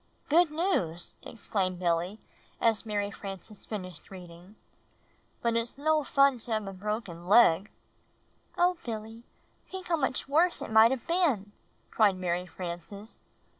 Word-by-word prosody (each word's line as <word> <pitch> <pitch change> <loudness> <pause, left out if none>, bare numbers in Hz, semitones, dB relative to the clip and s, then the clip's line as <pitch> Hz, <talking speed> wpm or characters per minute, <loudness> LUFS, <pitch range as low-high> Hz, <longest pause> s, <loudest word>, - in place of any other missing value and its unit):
"Good 330 +2 +5
news!" 300 - -1
exclaimed 190 -5 -3
Billy 175 +3 0 0.4
as 225 -1 +2
Mary 205 -1 -1
Frances 195 +1 -9
finished 185 -6 -7
reading; 180 +1 -12 0.9
"but 235 -1 +1
it's 230 +3 -2
no 310 +1 +2
fun 275 -2 +3
to 230 0 -4
have 215 -1 -1
a 195 - -6
broken 190 -3 -5
leg." 200 -3 +5 0.9
"Oh, 355 0 +3
Billy, 225 0 -6 0.5
think 375 -1 -7
how 335 - +2
much 265 -2 -1
worse 330 +5 +3
it - - -6
might 220 +1 +7
have 260 -2 -3
been," 290 - +1 0.4
cried 210 -4 +4
Mary 180 0 -2
Frances. 180 +5 -8
215 Hz, 135 wpm, -29 LUFS, 185-265 Hz, 0.9 s, might